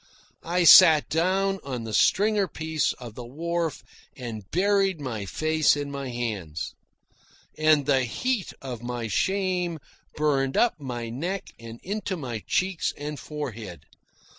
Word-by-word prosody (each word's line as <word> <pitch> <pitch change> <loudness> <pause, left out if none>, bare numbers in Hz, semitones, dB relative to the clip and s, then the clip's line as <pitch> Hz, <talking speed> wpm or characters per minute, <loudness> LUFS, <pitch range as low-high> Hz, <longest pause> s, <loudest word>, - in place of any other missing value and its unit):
I 175 +2 0
sat 155 -1 +8
down 190 +4 +1
on 130 -4 -4
the 110 -1 -6
stringer 205 - +3
piece 160 -1 -1
of 120 -4 -10
the 125 - -8
wharf 165 +5 -3 0.3
and 110 -6 -7
buried 195 0 +2
my 115 -8 -4
face 155 +4 +2
in 145 -1 -4
my 140 -2 -5
hands. 105 -11 -4 0.8
And 155 -2 +3
the 130 -1 +3
heat 235 - -2
of 125 -4 -6
my 120 -1 -4
shame 180 - 0 0.4
burned 135 -3 +1
up 240 -8 +3
my 120 -4 -5
neck 175 +11 -4
and 115 0 -10
into 200 -1 -3
my 120 -8 -5
cheeks 185 -2 0
and 145 0 -5
forehead. 115 - -7
145 Hz, 140 wpm, -26 LUFS, 120-180 Hz, 0.8 s, sat